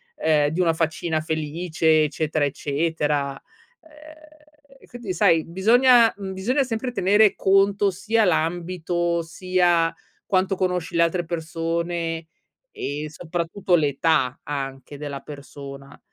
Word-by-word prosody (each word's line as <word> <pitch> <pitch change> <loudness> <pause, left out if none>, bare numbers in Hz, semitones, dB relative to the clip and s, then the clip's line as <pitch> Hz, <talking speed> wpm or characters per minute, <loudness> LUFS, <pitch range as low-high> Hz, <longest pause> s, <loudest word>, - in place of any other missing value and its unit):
ehm, 150 -2 +2
di 165 +4 -1
una 165 -2 +3
faccina 160 0 -1
felice 160 0 +1
eccetera 155 +1 -1
eccetera". 145 -1 -1 0.4
Ehm, 305 -2 -19
quindi 235 -6 -6
sai, 165 -1 +3
bisogna 230 +6 +5
mhmm, 195 -1 -6
bisogna 245 +9 0
sempre 250 0 -3
tenere 205 -1 +3
conto 195 +1 +3
sia 210 +5 +1
l'ambito, 175 0 0
sia 175 0 +1 0.3
quanto 190 0 +1
conosci 180 -2 -2
le 170 - +5
altre 175 +1 0
persone, 165 0 -3 0.5
e 145 +2 -4
soprattutto 175 +3 -1
l'età 145 -4 +1
anche 135 0 -6
della 140 -1 -6
persona. 140 -1 -11
170 Hz, 110 wpm, -23 LUFS, 155-195 Hz, 0.5 s, bisogna